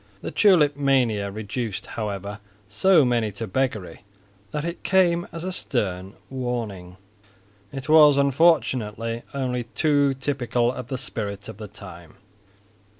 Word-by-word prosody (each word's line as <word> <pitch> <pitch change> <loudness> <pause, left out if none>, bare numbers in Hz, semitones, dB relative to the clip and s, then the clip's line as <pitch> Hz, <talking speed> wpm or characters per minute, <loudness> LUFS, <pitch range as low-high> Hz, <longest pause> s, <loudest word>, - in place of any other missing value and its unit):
The - - -4
tulip 165 -9 +4
mania 125 -8 +1
reduced, 110 +1 -4
however, 100 -2 -5 0.3
so 155 - +4
many 120 -3 +1
to 115 +4 -5
beggary 110 -4 -2 0.5
that 150 +8 -4
it 170 +1 -5
came 175 -3 +2
as 165 0 -7
a 185 - -3
stern 95 - -2
warning. 115 -9 -5 0.7
It 135 -1 -7
was 150 -2 +7
unfortunately 130 -6 +2
only 125 -3 -2
too 145 -3 +2
typical 125 -3 0
of 125 -2 -7
the 130 - -3
spirit 100 -5 -5
of 110 -3 -9
the 105 0 -8
time. 90 -4 -12
125 Hz, 130 wpm, -24 LUFS, 105-145 Hz, 0.7 s, was